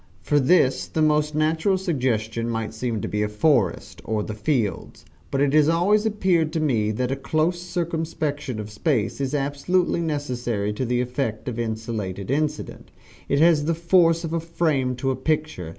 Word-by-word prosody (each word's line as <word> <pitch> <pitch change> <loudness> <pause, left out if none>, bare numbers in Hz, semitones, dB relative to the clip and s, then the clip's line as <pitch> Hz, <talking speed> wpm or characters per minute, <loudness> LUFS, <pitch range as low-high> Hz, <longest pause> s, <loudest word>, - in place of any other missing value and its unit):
For 145 - +2
this 135 -2 +3
the - - -4
most 150 0 +2
natural 160 +5 +2
suggestion 120 - -1
might 115 -1 -3
seem 110 -1 -3
to - - -3
be 105 - -2
a 105 - 0
forest, 105 - +1
or 110 -1 -1
the 110 - -5
fields 105 0 -2 0.2
but 135 - -1
it 140 -1 +2
has 155 0 +5
always 205 +6 +3
appeared 185 -7 +1
to 165 - 0
me 120 -9 +1
that 125 +4 -1
a - - +1
close 155 +5 0
circumscription 160 - -3
of 105 0 -6
space 125 - -1
is 135 +1 -1
absolutely 145 +6 0
necessary 125 -9 -2
to 130 +5 -2
the 125 0 +1
effect 125 -2 -3
of 120 -2 -3
insulated 110 -3 -4
incident 150 +1 -2 0.4
it 140 - +2
has 155 -1 +4
the 165 +1 +1
force 170 0 +3
of 165 -1 -4
a 165 - +1
frame 155 -6 0
to 135 +2 -1
a - - -1
picture. 150 - -2
140 Hz, 180 wpm, -23 LUFS, 115-160 Hz, 0.4 s, has